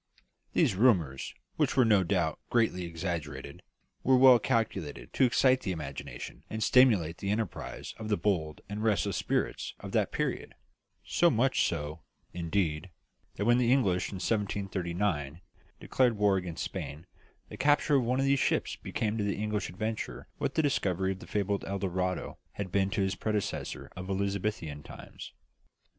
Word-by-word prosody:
These - - +3
rumours, 90 - +2 0.2
which - - +1
were 130 - +6
no 105 -4 +5
doubt 85 -4 0
greatly 110 -7 +1
exaggerated, 80 -5 -5 0.4
were 130 0 +5
well 130 -1 +8
calculated 85 - -2
to 135 - +4
excite 130 +1 +4
the 95 - -2
imagination 70 -7 -7
and 110 0 -2
stimulate 105 -11 +4
the 100 - -3
enterprise 110 +2 -3
of 110 -1 -5
the 105 - +2
bold 80 -7 -1
and 105 +1 -4
restless 105 -3 +1
spirits - - -1
of - - -8
that - - +1
period; - - -2 0.5
so 175 - +4
much 130 +1 +2
so, 75 0 -4 0.3
indeed, 85 -1 -1 0.5
that 105 - -2
when 120 +2 +5
the 120 -1 +3
English, 95 -10 +2
in - - -7
1739, 95 -6 -1 0.4
declared 125 -4 +2
war 100 -1 +4
against 90 -3 -3
Spain, 75 +4 -6 0.4
the - - -8
capture 145 0 +3
of 130 - +2
one 125 +2 0
of 135 - +2
these 140 0 +3
ships - - +1
became 110 0 -2
to - - +1
the 100 -1 0
English 105 0 -2
adventurer 110 +5 -4
what - - -2
the 160 - +3
discovery 95 - +1
of 95 - -5
the - - -11
fabled 100 -1 -1
El 100 - -2
Dorado 90 -1 -2
had 100 -3 -5
been 95 0 +2
to 105 0 -1
his 95 0 +1
predecessor 105 -2 -3
of 95 +1 -7
Elizabethan 100 -6 -2
times. - - -10
100 Hz, 160 wpm, -30 LUFS, 85-110 Hz, 0.5 s, well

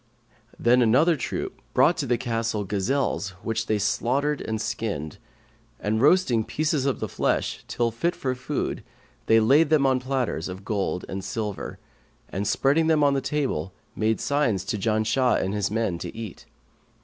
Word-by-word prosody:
Then 125 +2 +4
another 135 +9 +4
troop 140 - -4
brought 170 - +5
to 145 -6 -2
the 120 0 +2
castle 115 -3 -1
gazelles 100 0 -1
which 115 0 -2
they 110 - +2
slaughtered 135 +8 0
and 110 0 -3
skinned; 100 -9 -3 0.6
and 110 +2 0
roasting 140 -7 +4
pieces 155 +1 0
of 135 - 0
the - - -2
flesh - - -1
till 120 -1 0
fit 170 +10 -1
for 130 -2 -2
food 125 0 -3 0.4
they 115 0 +6
laid 140 +8 +4
them 155 -3 +4
on 130 -1 +3
platters 125 -10 -2
of 95 +2 -8
gold 100 -4 -2
and 95 0 -5
silver 105 0 -4 0.5
and 100 +2 -3
spreading 145 +8 +2
the 145 -4 +3
table, 130 - -2 0.2
made 110 +1 +1
signs 140 -10 +1
to 105 - -2
Janshah 110 +4 +2
and 95 +1 -1
his 105 -1 0
men 105 -5 -1
to - - -7
eat. 110 -5 -8
115 Hz, 160 wpm, -25 LUFS, 105-140 Hz, 0.6 s, they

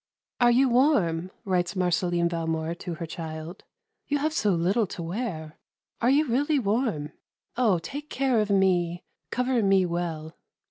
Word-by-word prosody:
"Are 240 -1 +5
you 255 +3 +4
warm?" 215 - +2 0.2
writes 180 -1 0
Marceline 175 -1 +1
Valmore 165 -1 -2
to 175 0 -6
her 165 - -5
child. 160 +2 -7 0.4
"You 290 - +1
have 305 +2 -1
so 215 -10 +1
little 190 +5 +2
to 175 -2 -6
wear 165 -4 -5 0.4
are 240 - +3
you 290 +4 +4
really 285 +5 +1
warm? 210 - -1 0.4
Oh, 225 -7 +3
take 290 - -7
care 260 -3 +1
of 210 -1 0
me 180 -3 +2 0.3
cover 250 -1 +1
me 195 -2 +4
well." 170 -2 -3
185 Hz, 150 wpm, -26 LUFS, 170-245 Hz, 0.4 s, Are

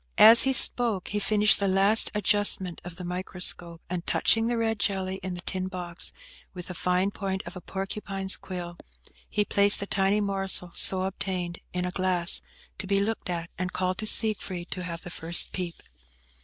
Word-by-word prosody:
As 225 +2 +9
he 265 - +2
spoke 235 -6 +4
he 210 - -2
finished 210 +1 +3
the 200 - 0
last 195 +3 +4
adjustment 205 -3 +2
of 180 -1 -9
the 180 - -5
microscope, 180 -1 -2
and 175 -1 -5
touching 225 0 +2
the 240 0 -1
red 225 -2 -2
jelly 190 -1 -2
in 185 -1 -5
the 175 - -8
tin 185 0 -4
box 175 -2 -4 0.4
with 180 -1 -8
the - - -5
fine 180 +3 -1
point 190 -2 -4
of - - -9
a 180 - -9
porcupine's 195 +1 -4
quill, 175 -2 -8 0.5
he 210 -1 0
placed 200 0 +3
the 200 - -3
tiny 195 +1 +1
morsal 195 -3 0
so 185 -1 +3
obtained 185 -2 -4
in 180 0 -3
a 180 - -3
glass, 185 -1 +2 0.4
to 190 - -5
be 195 0 +1
looked 210 -1 -3
at, 170 -1 -5
and 180 0 -4
called 185 0 -2
to 215 - +2
Siegfried 190 -6 0
to 185 - -4
have 170 -2 -7
the 175 - -9
first 165 +1 0
peep. 180 -2 -5
190 Hz, 185 wpm, -26 LUFS, 180-200 Hz, 0.5 s, As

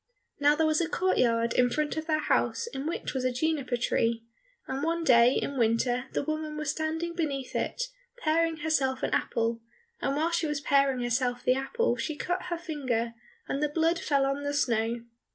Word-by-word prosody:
Now 290 +1 +5
there 320 +1 +2
was 310 +1 +2
a 330 - -1
court 375 +1 +1
yard 230 -1 +2
in 250 0 +4
front 300 +4 -1
of 315 0 -4
their 310 -1 +1
house - - +1
in 290 -11 -5
which 335 - -3
was 260 -2 -2
a 255 - +2
juniper 265 -2 0
tree, 230 -1 0 0.4
and 265 +1 -3
one 330 +2 0
day 245 -3 +6
in 275 -2 -2
winter 245 +2 +2
the - - 0
woman 310 0 -3
was 300 -1 -1
standing 320 +2 -2
beneath 285 -6 -3
it, - - -1 0.3
paring 330 -4 +1
herself 270 -5 +1
an - - 0
apple, 230 0 0 0.4
and 275 - 0
while 320 +3 +1
she 335 -1 +1
was 295 -1 -1
paring 275 -2 +2
herself 245 0 0
the 255 - +4
apple 365 - 0
she 310 - -3
cut 355 +4 -2
her 345 -1 -2
finger, 255 -9 -2 0.3
and 275 - -2
the 300 - +1
blood 330 +3 +1
fell 280 -4 +2
on 275 +1 -1
the 285 0 -2
snow. 235 -3 +1
285 Hz, 200 wpm, -28 LUFS, 250-315 Hz, 0.4 s, day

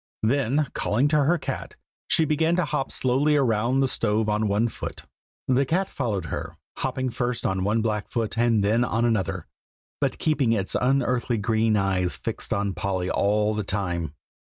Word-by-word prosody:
Then, 135 +4 +2
calling 120 +7 +1
to 150 -2 +3
her 175 +4 +3
cat, - - -5 0.3
she 160 - +3
began 160 +3 +2
to 180 -2 +1
hop 135 - -2
slowly 140 +4 +2
round 125 +1 +2
the - - +3
stove 110 -3 0
on 105 +1 +1
one 105 +3 +2
foot. - - -6 0.4
The 130 +1 +3
cat 180 +7 0
followed 105 -9 -2
her, - - -5 0.2
hopping 130 -1 -2
first 120 0 -2
on 95 -1 0
one 110 +3 +1
black 105 -2 -2
foot 115 -2 -2
and 115 -3 +2
then 110 +4 +3
on 120 -1 0
another, 95 -6 0 0.5
but - - 0
keeping 140 -7 +1
its 100 -4 -1
unearthly 125 -2 +1
green 110 0 +1
eyes 95 -2 0
fixed - - -4
on 100 -1 0
Polly 95 +1 -2
all 105 +1 +2
the 105 0 -2
time. 85 -7 -2
115 Hz, 175 wpm, -25 LUFS, 100-130 Hz, 0.5 s, to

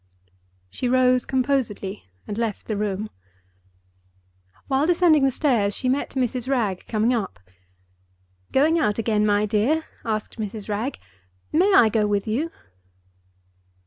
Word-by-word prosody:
She 250 - -2
rose 255 0 +3
composedly 250 -7 -1 0.2
and 205 - -5
left 225 -2 -3
the 215 - -1
room. 205 0 -3 1.6
While 275 +3 +1
descending 340 -4 +4
the - - +4
stairs, 235 -8 +1
she 255 - -1
met 275 +2 -1
Mrs. 250 -1 -1
Wragge 215 -9 -1
coming 225 +2 +1
up. 195 - -3 1.1
"Going 315 +5 +3
out 210 -9 +1
again, 215 -2 +1
my 205 0 +2
dear?" 235 +10 +1 0.2
asked 215 0 -3
Mrs. 210 -1 -5
Wragge. 220 +7 -2 0.5
"May 365 +6 +3
I 230 - +7
go 215 -1 +1
with 205 -1 0
you?" 250 +10 -1
230 Hz, 130 wpm, -23 LUFS, 210-270 Hz, 1.6 s, I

